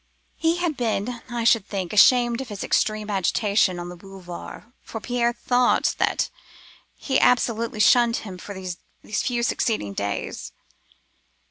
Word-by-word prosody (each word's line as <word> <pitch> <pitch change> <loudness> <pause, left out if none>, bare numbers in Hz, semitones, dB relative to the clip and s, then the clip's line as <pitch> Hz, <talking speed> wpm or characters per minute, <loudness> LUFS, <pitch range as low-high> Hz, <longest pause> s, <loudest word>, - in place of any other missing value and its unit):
"He 325 0 +1
had 345 -3 -1
been, 235 0 -2
I 240 -1 -3
should 225 -3 +3
think, 190 -3 -4
ashamed 240 +3 +5
of 265 - -7
his 205 -2 -5
extreme 215 -1 0
agitation 200 0 +1
on 175 0 -6
the 175 - -8
Boulevards, 180 -1 -10 0.2
for 225 - -7
Pierre 240 +1 0
thought 245 +1 +2
that - - +1 0.6
he 265 -2 0
absolutely 230 -2 +2
shunned 235 +2 +5
him 185 -3 -8
for 200 +2 -8
these 185 -2 -6 0.4
few 240 -2 -1
succeeding 215 - -1
days. 100 0 -4
220 Hz, 140 wpm, -24 LUFS, 190-240 Hz, 0.6 s, ashamed